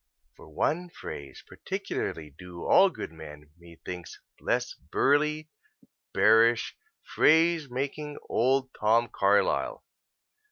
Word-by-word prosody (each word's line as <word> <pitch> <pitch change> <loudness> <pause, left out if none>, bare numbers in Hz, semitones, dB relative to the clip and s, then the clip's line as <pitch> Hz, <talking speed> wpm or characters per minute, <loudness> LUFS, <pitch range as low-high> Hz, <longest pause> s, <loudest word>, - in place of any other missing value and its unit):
For - - -15
one 175 +2 -1
phrase 70 - -9
particularly 75 -2 -5
do 85 +3 -11
all 195 - +6
good 155 - -7
men, 75 -2 -12
methinks, 85 0 -10 0.2
bless - - -1
burly, 150 +2 0 0.6
bearish, 115 +2 +4 0.3
phrase 160 -2 +3
making 140 +4 -4
old 130 +2 +1
Tom 115 +2 +2
Carlyle. 100 - +1
115 Hz, 95 wpm, -27 LUFS, -, 0.6 s, all